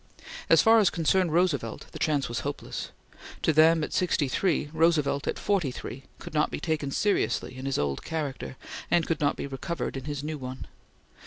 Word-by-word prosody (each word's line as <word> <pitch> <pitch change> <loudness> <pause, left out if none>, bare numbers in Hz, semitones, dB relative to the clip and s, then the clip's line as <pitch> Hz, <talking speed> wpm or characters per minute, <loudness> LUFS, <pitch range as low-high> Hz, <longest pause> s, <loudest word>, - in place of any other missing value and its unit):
As - - +6
far 225 0 +7
as 205 - +5
concerned 175 +1 +1
Roosevelt, 155 -9 0
the - - -8
chance 145 -3 +1
was 120 -1 -3
hopeless. - - -5 0.5
To 160 - +3
them 160 +1 +5
at - - -4
sixty 170 -5 +1
three, 155 +3 0
Roosevelt 155 -3 +2
at - - -1
forty 195 -8 +1
three 130 +1 -7
could - - -10
not 150 0 +2
be - - -4
taken 155 -4 -1
seriously 200 -4 0
in 130 +1 -5
his 135 - 0
old 70 -2 -1
character, 145 -4 -4 0.3
and 170 -1 +3
could 165 -2 -2
not 145 -1 +2
be - - -4
recovered 140 +2 -4
in 135 -1 -6
his 145 -1 -4
new 155 0 -4
one. 130 0 -6
150 Hz, 190 wpm, -27 LUFS, 135-165 Hz, 0.5 s, far